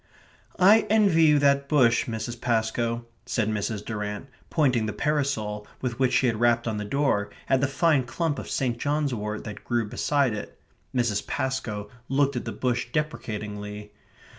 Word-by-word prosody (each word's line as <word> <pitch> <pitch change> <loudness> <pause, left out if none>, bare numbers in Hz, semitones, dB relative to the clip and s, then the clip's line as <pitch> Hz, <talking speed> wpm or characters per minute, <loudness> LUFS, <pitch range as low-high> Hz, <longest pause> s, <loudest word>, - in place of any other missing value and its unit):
"I 205 +4 +6
envy 200 -7 +5
you 150 -1 +6
that 140 -1 +3
bush, 120 -6 +4
Mrs. 115 +1 -5
Pascoe," 115 0 0 0.2
said 110 -3 0
Mrs. 105 0 -2
Durrant, 105 +3 -4 0.2
pointing 125 -8 +2
the 110 - -3
parasol 120 -9 -1
with 125 -2 -3
which 130 -2 +3
she - - +3
had 115 -3 +1
rapped 120 0 +3
on 110 -2 -1
the 105 - -3
door 135 -4 +1 0.2
at 135 -1 +3
the 140 - +3
fine 140 -1 +2
clump 150 +3 -2
of - - -7
St. 120 -3 -1
John's 145 -1 0
wort 105 -1 -4
that 105 - -8
grew 120 -2 0
beside 140 +2 +1
it. 105 - -7 0.4
Mrs. 120 -5 0
Pascoe 130 -7 -2 0.2
looked 140 +1 +2
at 125 - -3
the - - -3
bush 125 -1 -1
deprecatingly. 105 -8 -4
120 Hz, 165 wpm, -26 LUFS, 110-140 Hz, 0.4 s, I